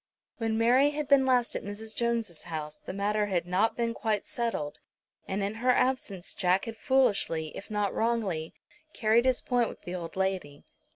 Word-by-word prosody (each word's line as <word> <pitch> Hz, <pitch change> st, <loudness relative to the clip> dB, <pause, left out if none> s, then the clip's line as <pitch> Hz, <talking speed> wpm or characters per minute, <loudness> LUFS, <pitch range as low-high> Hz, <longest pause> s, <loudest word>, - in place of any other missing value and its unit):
When 225 Hz, -1 st, 0 dB
Mary 250 Hz, +5 st, +5 dB
had 295 Hz, -1 st, -3 dB
been 275 Hz, -2 st, +5 dB
last 250 Hz, -2 st, +2 dB
at -, -, -3 dB
Mrs. 215 Hz, +2 st, -6 dB
Jones' 230 Hz, -8 st, -1 dB
house 155 Hz, -3 st, -6 dB
the -, -, -7 dB
matter 205 Hz, +2 st, 0 dB
had 180 Hz, -4 st, 0 dB
not 185 Hz, +5 st, +1 dB
been 230 Hz, -1 st, 0 dB
quite 215 Hz, -3 st, -1 dB
settled, 230 Hz, -11 st, -3 dB, 0.5 s
and 195 Hz, +1 st, -1 dB
in 200 Hz, +1 st, -1 dB
her 255 Hz, -, +2 dB
absence 250 Hz, -8 st, +1 dB
Jack 185 Hz, +1 st, +2 dB
had 225 Hz, -1 st, -6 dB
foolishly, 205 Hz, -, +1 dB
if 200 Hz, -, -8 dB
not 210 Hz, -2 st, 0 dB
wrongly, 210 Hz, -9 st, -1 dB, 0.4 s
carried 225 Hz, +1 st, +3 dB
his 260 Hz, -1 st, +3 dB
point 245 Hz, -3 st, +1 dB
with -, -, -12 dB
the 175 Hz, -, -6 dB
old 170 Hz, -2 st, -5 dB
lady. 190 Hz, -7 st, -2 dB
215 Hz, 180 wpm, -29 LUFS, 185-235 Hz, 0.5 s, Mary